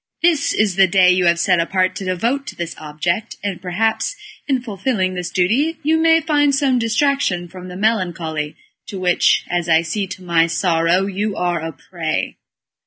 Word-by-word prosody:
This 330 -4 +3
is 205 -3 +1
the 195 -1 +6
day 180 0 +5
you 180 -1 +2
have 170 0 +3
set 175 +1 +2
apart 185 +2 0
to 195 - -6
devote 235 +10 -1
to - - -7
this 170 -1 -5
object, 165 +8 -3
and 195 -4 -3
perhaps 220 - -1 0.3
in 270 -3 +1
fulfilling 205 -4 -2
this 180 -1 -4
duty 250 - +1
you 310 +2 +2
may 325 0 +4
find 290 -3 +2
some 270 -3 +2
distraction 230 -6 0
from 185 +1 -10
the 180 0 -8
melancholy 175 -8 -1 0.3
to 195 - -6
which, 180 -1 +2
as 175 -1 -2
I 165 0 +4
see 195 +4 -2
to 185 0 -9
my 170 -2 +2
sorrow, 170 +1 +1
you 200 +1 -2
are 175 -1 -1
a 165 0 -4
prey." 160 -2 -4
185 Hz, 180 wpm, -19 LUFS, 175-230 Hz, 0.3 s, the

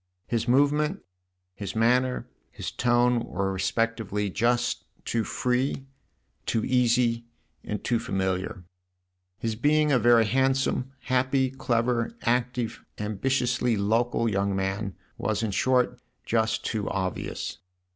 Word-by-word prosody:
His 115 0 -1
movement, 150 +7 +2 0.5
his 100 +1 -6
manner, 125 +3 +2 0.2
his - - -6
tone 120 0 +3
were 95 0 -2
respectively 105 +1 -1
just 120 +4 +1 0.2
too 115 -1 0
free, 125 +4 -1 0.6
too 110 - +1
easy 120 -2 +2 0.4
and 105 - -4
too 120 -1 +1
familiar; 95 -1 -2 0.7
his 115 -1 -2
being 150 +5 +3
a 130 - +4
very 115 0 +5
handsome, 130 +2 +1
happy, 130 0 +1
clever, 120 - 0
active, 125 -1 0
ambitiously 120 +2 0
local 115 +3 +1
young 100 -2 0
man 95 0 -2 0.2
was 110 +1 -1
in 110 - 0
short 125 +3 +2 0.2
just 110 0 0
too 110 -3 -1
obvious. 95 -1 -3
115 Hz, 115 wpm, -27 LUFS, 105-125 Hz, 0.7 s, very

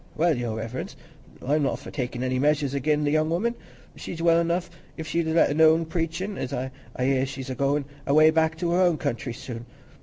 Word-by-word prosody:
"Well, 165 0 +2
Your 120 -3 -3
Reverence, 115 +3 -5 0.5
I'm 150 +3 +2
not 135 - 0
for - - -10
takin' 125 -2 -3
any 130 0 0
measures 145 -1 +2
again' 150 +2 +1
the 145 - +1
young 155 +1 +2
woman. 200 +8 0 0.4
She's 165 - -7
well 170 0 +4
enough 170 +1 -1 0.3
if 160 - -5
she'd 165 +1 -1
let 160 -2 +3
alone 160 +2 +5
preachin'; 170 +4 -3
an' 130 +1 -3 0.2
I 125 - -2
hear 135 -1 +2
as 135 - -1
she's 135 -1 -6
a - - -1
goin' 140 +2 0 0.2
away 155 +3 +6
back 160 0 +1
to 170 0 -1
her 180 +2 +3
own 175 -3 +3
country 120 -2 -3
soon. 120 0 -8
150 Hz, 210 wpm, -25 LUFS, 130-165 Hz, 0.5 s, away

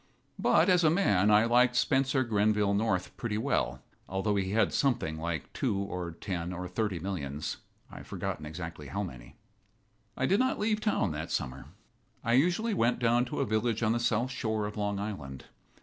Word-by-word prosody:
But, - - +4
as 180 -2 +4
a 155 - +6
man, 105 - +3
I 105 +1 +6
liked 120 +1 +4
Spencer 130 +2 +2
Grenville 105 -2 +2
North 100 -3 0
pretty 110 -3 -2
well, 130 +5 -1 0.3
although 95 +2 0
he 95 -1 0
had 110 +3 +2
something 95 - 0
like 80 -3 -4
two 100 - 0
or 90 -3 -3
ten 85 0 -4
or 90 0 -5
thirty 100 0 -1
millions 75 -5 -4 0.3
I've - - -10
forgotten 75 - -4
exactly 80 -1 -7
how 100 +8 -3
many. 65 -10 -9 0.8
I 130 - +1
did 195 +9 +3
not 260 +1 +2
leave 215 0 0
town 210 - +1
that 80 +1 -5
summer. 65 +1 -3 0.6
I 115 - +1
usually 180 - +2
went 120 -7 +2
down 120 0 +2
to 125 - -3
a - - +2
village 110 +1 0
on 110 - +3
the 120 - +1
south 120 +2 +1
shore 110 -4 -1
of 105 - -5
Long 105 -1 -1
Island. 85 -11 -6
105 Hz, 180 wpm, -30 LUFS, 90-125 Hz, 0.8 s, a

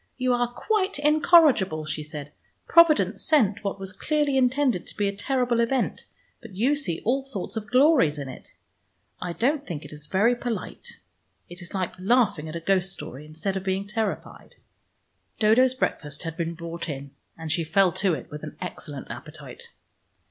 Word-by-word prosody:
"You 255 -1 +1
are 245 0 +1
quite 400 - 0
incorrigible," 295 - +4
she 155 0 -4
said. 150 -1 -8 0.4
"Providence 295 - +5
sent 220 -9 +2
what 200 -1 -3
was 190 -1 -6
clearly 295 +5 0
intended 255 -5 +2
to - - -11
be 205 -1 +1
a 200 - -2
terrible 245 +2 0
event, 235 +2 0 0.3
but 230 -6 -12
you 245 +9 +2
see 205 - -2
all 265 +4 +1
sorts 240 -6 -4
of 215 -1 -5
glories 255 - +4
in 140 -2 -5
it. 130 - -11 0.7
I 180 - -3
don't 275 - 0
thing 170 - -5
it - - -10
is 150 0 -8
very 215 +8 +3
polite. 240 -2 -5 0.5
It 175 +1 -9
is 175 +2 -9
like 185 -2 -2
laughing 190 -6 +2
at 155 - -7
a - - -2
ghost 190 +1 +1
story 150 -5 -8
instead 160 +6 -3
of 190 - -3
being 190 +1 -1
terrified." 215 +1 -4 0.8
Dodo's 245 +4 +4
breakfast 150 - -2
had 165 -1 -5
been 170 0 -3
brought 170 0 -6
in, 140 -1 -6 0.3
and 160 -1 -5
she 165 +1 +1
fell 190 +3 +3
to 185 0 +1
it 135 - -9
with 150 0 -7
an - - -8
excellent - - -7
appetite. 470 0 -9
200 Hz, 175 wpm, -25 LUFS, 170-255 Hz, 0.8 s, Providence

